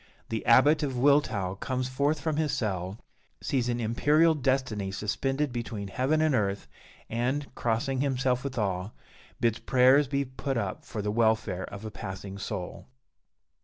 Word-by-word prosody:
The 110 -1 -2
Abbot 145 +6 +6
of 135 -4 -2
Wiltau 120 -9 +2
comes 130 0 -2
forth 140 +4 0
from 160 -2 -1
his 155 -2 +1
cell, 95 -3 -2 0.4
sees 125 -3 -1
an 120 0 -1
imperial 150 +8 +3
destiny 130 -8 -1
suspended 135 +8 -1
between 110 -4 -4
heaven 135 +9 +1
and 155 -2 +2
earth, 100 - 0 0.4
and, 130 +5 -2
crossing 130 +3 -1
himself 130 -2 0
with 135 -2 -5
awe, 95 -3 -1 0.5
bids 115 -1 +1
prayers 130 +3 +4
be 140 +1 0
put 135 +1 -3
up - - -3
for 105 -3 -5
the 105 - -1
welfare 110 -4 +1
of 100 +2 -9
a 110 - -5
passing 95 -1 -7
soul. 90 -2 -5
125 Hz, 155 wpm, -28 LUFS, 105-140 Hz, 0.5 s, Abbot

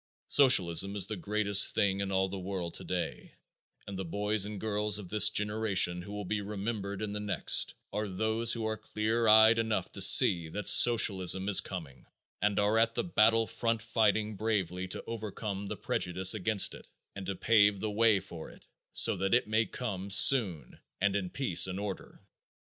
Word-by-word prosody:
Socialism 100 - +3
is 100 -3 +3
the 110 - -6
greatest 100 +1 +3
thing 100 -1 -1
in 100 0 -5
all 95 0 -1
the 95 0 -8
world 90 -2 -7
today 90 -1 -7 0.5
and 100 -1 -9
the - - -5
boys 105 +3 -3
and 105 -1 -8
girls 105 -1 -2
of 100 -4 -10
this 105 +1 +4
generation 105 -4 0
who 100 - -12
will 105 -1 -8
be 105 +2 -4
remembered 100 0 -7
in 105 -1 -6
the 105 - -6
next 100 -5 +1 0.2
are 105 +1 -4
those 110 +4 -1
who 115 -2 -5
are 110 0 -4
clear 110 +2 -4
eyed 110 +1 +4
enough 110 -1 -4
to - - -8
see 85 -3 +6
that 105 +4 -8
socialism 95 -5 +4
is 105 - +5
coming 75 -10 -11 0.3
and 105 -1 -1
are 105 +2 0
at 115 0 -1
the - - -3
battle 115 -7 +1
front 115 0 -4
fighting 110 -2 -2
bravely 95 -4 -4
to 90 - -5
overcome 105 -3 -7
the - - -7
prejudice 90 +2 +1
against 110 -1 +1
it - - -15 0.3
and 100 -1 -9
to 95 - -4
pave 105 0 +1
the 110 +1 -5
way 110 -1 +1
for 85 -4 -12
it - - -19 0.3
so - - +5
that 95 +4 -1
it 125 - 0
may 110 +1 -1
come 100 -6 -7
soon 95 - +4 0.2
and 100 0 -1
in 95 -3 -4
peace 115 -9 +1
and 95 +1 -7
order. 100 -2 -9
105 Hz, 185 wpm, -28 LUFS, 95-110 Hz, 0.5 s, see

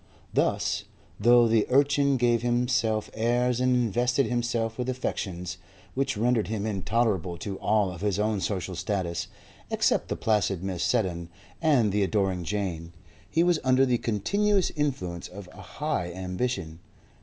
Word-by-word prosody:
Thus, - - 0 0.3
though 120 +2 +6
the 110 -1 +2
urchin 140 +1 +3
gave 120 -2 +2
himself 120 -2 0
airs 120 +2 +1
and 125 0 +3
invested 125 +3 +1
himself 120 -1 -1
with 125 +1 -1
affectations, 90 -7 -4 0.3
which 135 -3 -1
rendered 115 0 +1
him 110 -1 -3
intolerable 100 -3 0
to 95 +2 -5
all 105 -3 +2
of 90 - -9
his 100 -2 0
own 105 -1 0
social 95 -2 -2
status, 85 -2 -2 0.4
except - - +1
the - - -2
placid 100 -4 0
Mrs. 95 -2 -3
Seddon 90 -8 0 0.3
and 135 -10 +3
the 105 +1 +1
adoring 95 -3 0
Jane, 85 -3 -3 0.4
he 165 - +2
was 175 -2 +3
under 130 +1 +4
the 125 -2 +1
continuous 200 - +1
influence 110 - -2
of 100 0 -10
a - - -12
high 145 - -3
ambition. 90 -1 -3
110 Hz, 145 wpm, -27 LUFS, 95-125 Hz, 0.4 s, though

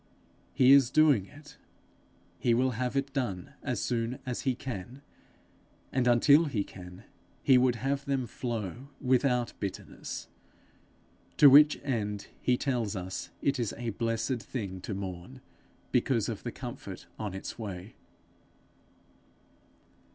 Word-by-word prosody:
He 130 0 +5
is 135 -3 +7
doing 140 -9 +4
it; 145 0 -15 0.8
he 120 -1 +3
will 130 +2 +2
have 125 +3 -2
it 135 0 -1
done 105 -10 -3
as - - -2
soon 120 +1 -1
as 125 -2 -3
he 130 -2 0
can; 125 +2 -7 0.9
and 125 -1 +1
until 140 +7 +6
he 115 -9 -1
can, 90 -2 -12 0.4
he 130 -2 +6
would 125 -1 +3
have 135 +4 -2
them 135 -2 0
flow 120 +2 -5
without 125 -2 +2
bitterness; 100 -2 -6 1.1
to 145 -2 +9
which 150 +2 +7
end 105 -6 -2
he 125 -1 +2
tells 120 -7 -1
us 95 0 -5
it 140 -1 +1
is 115 -4 -2
a 120 -1 -3
blessed 115 +3 -1
thing 100 -5 -5
to 100 - -4
mourn, 95 +6 -7 0.5
because - - +1
of - - -4
the - - -4
comfort - - -8
on 105 -3 -4
its 95 - -7
way. 100 -2 -6
120 Hz, 135 wpm, -30 LUFS, 105-135 Hz, 1.1 s, to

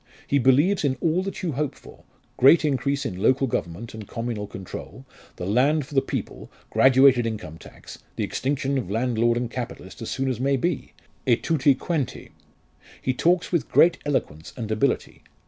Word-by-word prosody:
He 140 - +1
believes 145 +10 +3
in 135 -3 +1
all 170 +2 +1
that 195 0 -6
you 175 - 0
hope 145 +1 -2
for - - -16 0.3
great 155 +5 +6
increase 140 0 0
in 95 -4 -4
local 130 +5 +3
government 110 -2 -4
and 110 -2 -8
communal 115 -3 -4
control 95 +8 -9 0.3
the 90 - -6
land 135 +9 +2
for 145 - -14
the 135 - +4
people - - -5 0.2
graduated 130 -2 +5
income 105 -8 -6
tax - - -13 0.2
the - - -2
extinction 135 0 -1
of 95 - -6
landlord 120 +1 +1
and 120 -1 -3
capitalist 115 -7 -7
as 115 - -5
soon 135 0 -2
as 130 -3 -2
may 135 +1 +1
be 165 +3 -2 0.3
e 120 - +6
tutti 140 +1 +2
quanti. 150 -2 -3 0.7
He 130 - -1
talks 175 +7 +1
with 170 -4 0
great 170 +1 +5
eloquence 80 - -3
and 110 -3 -4
ability. 110 +5 -1
130 Hz, 175 wpm, -24 LUFS, 115-145 Hz, 0.7 s, great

